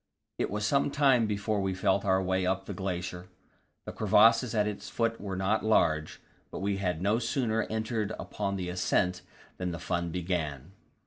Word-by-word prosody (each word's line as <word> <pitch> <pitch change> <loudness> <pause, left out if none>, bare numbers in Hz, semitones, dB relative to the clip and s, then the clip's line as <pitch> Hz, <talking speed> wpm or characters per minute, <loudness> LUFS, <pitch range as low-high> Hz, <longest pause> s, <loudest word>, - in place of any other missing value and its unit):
It - - 0
was 105 +1 -2
some 140 +5 +2
time 135 -5 +3
before 105 0 -1
we 95 -1 -1
felt 95 +1 +1
our 95 -1 +3
way 95 0 0
up 95 +1 0
to - - -6
the - - -6
glacier. 90 -2 -4 0.6
The - - -5
crevasses 115 +2 +4
at 105 -1 +3
its 105 -1 -5
foot 115 -1 -1
were 100 -2 -4
not 95 +4 0
large, 80 -8 +2 0.3
but - - -7
we 100 0 -1
had 90 -3 -2
no 105 +4 +2
sooner 115 -3 0
entered 110 -1 -2
upon 100 -1 -3
the 95 -2 -3
ascent 90 0 0 0.4
than 90 -1 -2
the 85 - -4
fun 85 +1 -2
began. 80 -4 -3
100 Hz, 185 wpm, -29 LUFS, 90-110 Hz, 0.6 s, crevasses